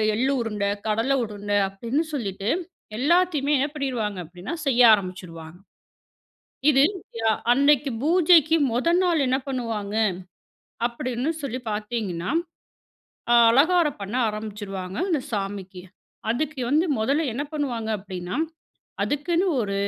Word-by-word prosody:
எள்ளு 260 +4 +1
உருண்ட, 210 -3 -2 0.2
கடல 225 +5 +1
உருண்ட 205 -2 -5
அப்பிடின்னு 235 +11 -2
சொல்லிட்டு, 200 -5 -3 0.5
எல்லாத்தையுமே 305 +1 +2
என்ன 270 +2 +1
பண்ணிருவாங்க 245 -9 -2
அப்பிடின்னா, 180 - -8
செய்ய 250 -2 +3
ஆரம்பிச்சிருவாங்க. 180 -4 -4 1.1
இது 270 -2 +5 0.5
அ - - +5 0.2
அன்னக்கி 280 +1 +3
பூஜைக்கு 325 0 +5 0.2
மொத 245 +7 -1
நாள் 350 -3 +2
என்ன 260 +1 +2
பண்ணுவாங்க 225 -6 -3 0.9
அப்பிடின்னு 245 +3 -2
சொல்லி 255 -3 -3
பாத்தீங்கன்னா, 210 -4 -3 1.0
அ - - +6 0.2
அலங்காரம் 300 - +3
பண்ண 200 +5 -5
ஆரம்பிச்சுருவாங்க, 205 -3 -5
அந்த 305 -6 +1
சாமிக்கு. 195 -3 -4 0.5
அதுக்கு 295 +2 -3
வந்து 305 +5 +3
1ல 280 +8 +1
என்ன 280 +5 -2
பண்ணுவாங்க 245 -7 -2
அப்பிடின்னா, 185 +1 -6 0.7
அதுக்குன்னு 335 +6 0 0.2
ஒரு 200 -1 -3
235 Hz, 110 wpm, -24 LUFS, 200-285 Hz, 1.1 s, அ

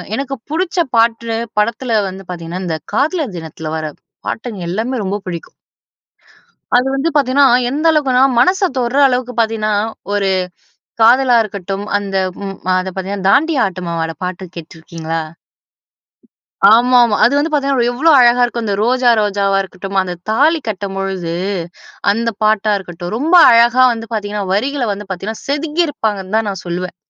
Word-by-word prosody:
எனக்கு 275 +2 -3 0.2
புடிச்ச 355 +3 -2 0.2
பாட்டு 230 0 +1 0.2
படத்தில 230 +1 0
வந்து 190 +1 -10
பார்த்தீங்கன்னா 175 +1 -6
இந்த 165 -2 -2 0.2
காதலர் 290 - 0
தினத்தில 160 -1 -7
வர 155 -1 -4 0.4
பாட்டுங்க 220 -5 -5
எல்லாமே 225 +8 -2
ரொம்ப 200 +2 -2
பிடிக்கும். 170 -2 -7 1.2
அது 250 +2 +2
வந்து 275 +4 0
பார்த்தீங்கன்னா, 275 0 +4 0.2
எந்த 300 +5 -1
அளவுக்குன்னா 265 -4 +2 0.2
மனச 370 +8 +3 0.2
தொடுற 245 +1 -1
அளவுக்கு 250 -1 -2
பார்த்தீங்கன்னா 220 -2 0 0.4
ஒரு 200 -1 +1 0.7
காதலா 250 +2 +5
இருக்கட்டும் 200 -1 -5
அந்த 200 -1 -4 0.3
ம் 195 -1 -5 0.2
அதை 185 +1 -3
பார்த்தீங்கன்னா 190 0 -4
தாண்டியா 295 0 +3
ஆட்டமுமாட 170 -3 -4
பாட்டு 180 +1 -5
கேட்டிருக்கீங்களா? 165 0 -6 1.5
ஆமா, 250 +2 +4
ஆமா. 215 - 0
அது 245 - +3
வந்து 310 +3 0
பார்த்தீங்கன்னா 275 -4 +1
எவ்வளோ 315 +6 +3
அழகா 245 0 +5
இருக்கும். 240 -1 -1
அந்த 200 -2 -1
ரோஜா, 250 +2 +2
ரோஜாவா 200 -1 +1
இருக்கட்டும், 195 +1 -6
அந்த 180 -1 -4 0.2
தாலி 310 +8 +3
கட்டும் 195 -2 -4
பொழுது 190 -3 -3 0.8
அந்த 230 +2 -1
பாட்டா 215 0 +2
இருக்கட்டும், 175 0 -7
ரொம்ப 320 +7 +2 0.2
அழகா 240 +2 +5
வந்து 225 0 -7
பார்த்தீங்கன்னா 205 -1 -3
வரிகள 260 +5 0
வந்து 205 0 -9
பார்த்தீங்கன்னா 195 +4 -5
செதுக்கி 300 +4 0
இருப்பாங்கன்னு 210 -7 -3
தான் 225 - 0
நான் 195 - -6
சொல்லுவேன். 180 +1 -4
220 Hz, 145 wpm, -16 LUFS, 190-255 Hz, 1.5 s, காதலா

